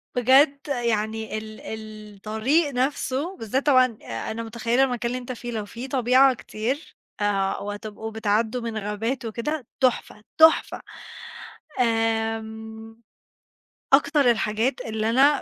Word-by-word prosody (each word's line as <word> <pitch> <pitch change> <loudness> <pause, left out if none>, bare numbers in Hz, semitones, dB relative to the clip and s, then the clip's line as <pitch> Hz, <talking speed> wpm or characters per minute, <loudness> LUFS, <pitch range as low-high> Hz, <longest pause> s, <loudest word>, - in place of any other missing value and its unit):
بجد 270 +3 +5
يعني 220 -4 -1
ال 215 0 -8
ال 215 -1 -8
الطريق 225 +10 0
نفسه 275 +6 -1
بالذات 255 +6 -2
طبعًا 255 -5 +4
آآ 115 - -5
أنا 230 +1 -4
متخيّلة 235 +3 +1
المكان 245 -3 -1
اللي 250 - -2
أنت 250 0 -7
فيه، 240 0 -6
لو 220 -3 -3
في 235 +5 -8
طبيعة 260 +1 +4
كتير 250 +5 -4 0.3
آآ 195 -2 +1
وهتتبقوا 205 +2 -6
بتعدّوا 220 +2 0
من 230 -1 -4
غابات 215 +5 -3
وكده 240 +4 -3
تُحفة، 245 -4 0
تُحفة. 320 0 +5 1.0
آمم 225 -1 -2 0.9
أكتر 280 -2 +5
الحاجات 225 +3 0
اللي 220 0 -1
أنا 275 +5 +4
230 Hz, 125 wpm, -24 LUFS, 220-260 Hz, 1.0 s, بجد